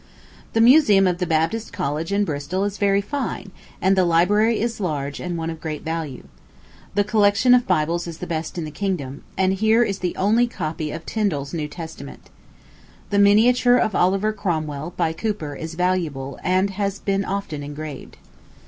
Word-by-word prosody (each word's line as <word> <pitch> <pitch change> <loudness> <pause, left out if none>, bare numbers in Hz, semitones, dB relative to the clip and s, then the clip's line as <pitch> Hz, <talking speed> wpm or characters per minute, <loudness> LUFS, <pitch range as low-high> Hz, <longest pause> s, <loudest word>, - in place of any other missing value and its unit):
The 225 - +3
museum 230 -6 +6
of 180 -1 +1
the 180 - -1
Baptist 165 +8 0
College 150 +5 -3
in 200 +1 +2
Bristol 155 +4 -2
is 205 0 -3
very 200 -1 +3
fine, 205 -4 -4 0.3
and 190 +2 +3
the 190 - +4
library 205 +7 +3
is 230 0 -2
large 145 -6 -3
and 175 -1 -4
one 165 0 -3
of 160 -1 -9
great 155 -2 -5
value. 160 -5 -4 0.7
The 205 - +3
collection 205 +3 +4
of 245 -1 +4
Bibles 170 0 0
is 165 -2 -7
the - - -6
best 160 +1 -4
in 165 - -3
the 155 - -7
kingdom, 155 -7 -3 0.2
and 190 0 +2
here 220 +4 +3
is 200 -4 -2
the 180 -1 -2
only 225 +5 +3
copy 155 -7 -4
of 160 - -7
Tindal's 155 -11 -2
New 155 -3 -2
Testament. 160 +1 -10 0.8
The 200 - +2
miniature 245 +5 +5
of 215 - +1
Oliver 195 +5 +2
Cromwell, 160 -5 -3
by 160 - +1
Cooper, 165 -5 -3
is 160 +3 -6
valuable, 165 -7 -1
and 185 +2 +2
has 200 0 -2
been 195 0 -1
often 195 -7 -4
engraved. 145 0 -8
185 Hz, 175 wpm, -22 LUFS, 160-205 Hz, 0.8 s, museum